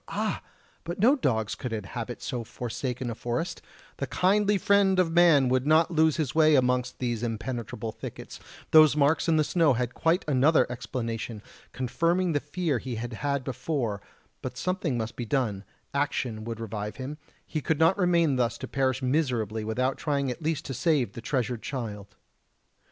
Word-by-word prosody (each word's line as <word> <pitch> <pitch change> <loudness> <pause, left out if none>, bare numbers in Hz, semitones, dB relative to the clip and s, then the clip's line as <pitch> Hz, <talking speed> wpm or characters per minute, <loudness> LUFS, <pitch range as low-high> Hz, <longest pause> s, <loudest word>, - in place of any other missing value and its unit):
Ah! - - -2 0.4
but 170 +1 -5
no 240 +8 +5
dogs 110 - 0
could 125 -4 -5
inhabit 115 +3 -5
so 120 -2 -3
forsaken 120 +2 -4
a - - -3
forest; 120 +10 -3 0.4
the 140 - -3
kindly 205 +5 +2
friend 195 0 +3
of 180 -3 +3
man 165 -6 +5
would 130 +2 +1
not 160 +2 +4
lose 160 -1 +3
his 150 -6 -1
way 155 -1 +5
amongst 125 -1 +1
these 120 -3 -2
impenetrable 115 -1 -4
thickets; 110 - -9 0.3
those 155 -2 +7
marks 150 +3 +2
in 165 -1 +3
the 155 - +4
snow 160 -2 +3
had 120 0 -2
quite 165 +2 +1
another 145 0 +4
explanation, 115 -3 -4 0.3
confirming 170 +8 0
the 145 - +1
fear 145 -2 -2
he 125 0 -5
had 120 +2 -5
had 140 +3 -1
before; 125 -5 -2 0.4
but - - -6
something 185 -8 -1
must 110 0 -4
be 120 - -4
done: 110 -5 -1 0.3
action 125 -6 -1
would 115 -1 -5
revive 105 -2 -5
him, 140 +6 -6 0.3
he 155 - -3
could 160 +2 0
not 165 +4 +4
remain 170 -7 +2
thus 120 -3 0
to - - -6
perish 130 -1 0
miserably 125 -6 0
without 130 +5 -1
trying 140 -4 0
at 140 - -7
least 155 0 -1
to 135 - -4
save 145 -2 +1
the 115 - -7
treasured 125 -2 -1
child. 105 -6 -6
130 Hz, 175 wpm, -27 LUFS, 120-160 Hz, 0.4 s, those